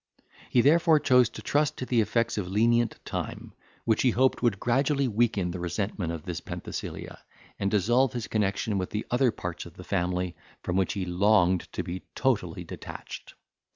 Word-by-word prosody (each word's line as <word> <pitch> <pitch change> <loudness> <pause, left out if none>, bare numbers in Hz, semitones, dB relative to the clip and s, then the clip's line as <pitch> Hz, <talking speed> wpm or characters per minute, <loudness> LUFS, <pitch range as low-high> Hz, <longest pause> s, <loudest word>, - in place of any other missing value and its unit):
He 120 - +4
therefore 160 +3 +5
chose 125 -4 +4
to - - -10
trust 145 0 +1
to 130 - -4
the 120 -2 +2
effects 115 +2 0
of 95 - -3
lenient 115 +4 +2
time, - - -5 0.3
which 110 -2 +2
he 130 - +4
hoped 130 +3 +2
would 115 -6 +1
gradually 135 +3 +1
weaken 105 -5 +1
the 90 - -5
resentment 90 0 -2
of 85 -2 -6
this 90 -3 -5
Penthesilea, - - -6 0.4
and 100 - +1
dissolve 120 +6 +2
his 120 -3 -3
connexion 100 -1 0
with 90 - -3
the 105 - -3
other 125 +1 +3
parts 90 -5 -6
of - - -15
the - - -10
family, 90 0 -1 0.3
from 90 - -2
which 95 -1 +1
he 95 -2 -2
longed 90 0 +2
to 90 - -2
be 90 +1 -5
totally - - 0
detached. - - -9
105 Hz, 180 wpm, -27 LUFS, 90-125 Hz, 0.4 s, therefore